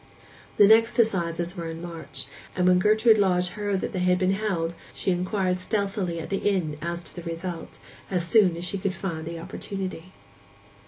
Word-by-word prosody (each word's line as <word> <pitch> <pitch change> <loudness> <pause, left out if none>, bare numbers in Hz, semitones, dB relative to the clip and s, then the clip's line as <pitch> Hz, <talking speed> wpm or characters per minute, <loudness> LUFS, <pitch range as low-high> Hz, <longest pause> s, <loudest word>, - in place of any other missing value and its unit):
The 205 - +8
next 225 +3 +5
assizes 175 -6 +1
were 170 -2 -4
in 165 0 -6
March; 160 -6 -7 0.3
and 180 0 +2
when 180 0 +5
Gertrude 215 +2 +5
Lodge 180 -2 +2
heard 205 0 -2
that - - -3
they 185 - -3
had 180 0 +3
been 185 0 +2
held, 190 -5 -1 0.2
she 190 - 0
inquired 185 0 0
stealthily 195 -3 -1
at 165 - -7
the 195 - +1
inn 180 -7 0
as 170 0 -3
to - - -10
the 175 - -6
result, 170 0 -6 0.3
as 180 -3 0
soon 185 -4 +4
as 170 - -2
she 195 +2 -2
could 190 0 -1
find 165 -5 -4
opportunity. 185 +1 -6
180 Hz, 180 wpm, -26 LUFS, 170-200 Hz, 0.3 s, The